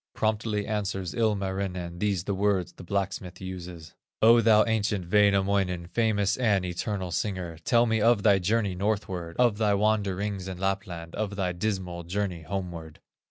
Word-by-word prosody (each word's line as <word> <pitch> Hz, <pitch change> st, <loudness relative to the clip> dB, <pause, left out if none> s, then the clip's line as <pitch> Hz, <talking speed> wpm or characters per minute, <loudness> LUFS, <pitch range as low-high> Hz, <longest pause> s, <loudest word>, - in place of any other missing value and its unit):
Promptly 110 Hz, -1 st, 0 dB
answers 95 Hz, -4 st, -2 dB
Ilmarinen, 95 Hz, -5 st, -2 dB
These 100 Hz, -4 st, 0 dB
the 100 Hz, -, -2 dB
words 95 Hz, -2 st, 0 dB
the -, -, -12 dB
blacksmith 95 Hz, -1 st, -3 dB
uses: 90 Hz, -4 st, -8 dB, 0.3 s
"O 115 Hz, +1 st, +6 dB
thou 110 Hz, -1 st, +5 dB
ancient 105 Hz, -5 st, -1 dB
Wainamoinen, 100 Hz, -3 st, +2 dB
Famous 100 Hz, 0 st, +1 dB
and 105 Hz, -7 st, +2 dB
eternal 90 Hz, +1 st, -3 dB
singer, 90 Hz, -3 st, -3 dB
Tell 120 Hz, 0 st, +4 dB
me 110 Hz, -2 st, +1 dB
of 115 Hz, -2 st, +4 dB
thy 100 Hz, -3 st, +5 dB
journey 100 Hz, +1 st, +1 dB
northward, 95 Hz, -3 st, -2 dB
Of 120 Hz, -4 st, +3 dB
thy 105 Hz, -2 st, +3 dB
wanderings 100 Hz, -2 st, 0 dB
in 95 Hz, -1 st, -5 dB
Lapland, 90 Hz, -3 st, -3 dB
Of 105 Hz, -1 st, -3 dB
thy 95 Hz, -2 st, -1 dB
dismal 90 Hz, -2 st, -3 dB
journey 90 Hz, -1 st, -2 dB
homeward." 85 Hz, -3 st, -6 dB
100 Hz, 150 wpm, -27 LUFS, 90-105 Hz, 0.3 s, O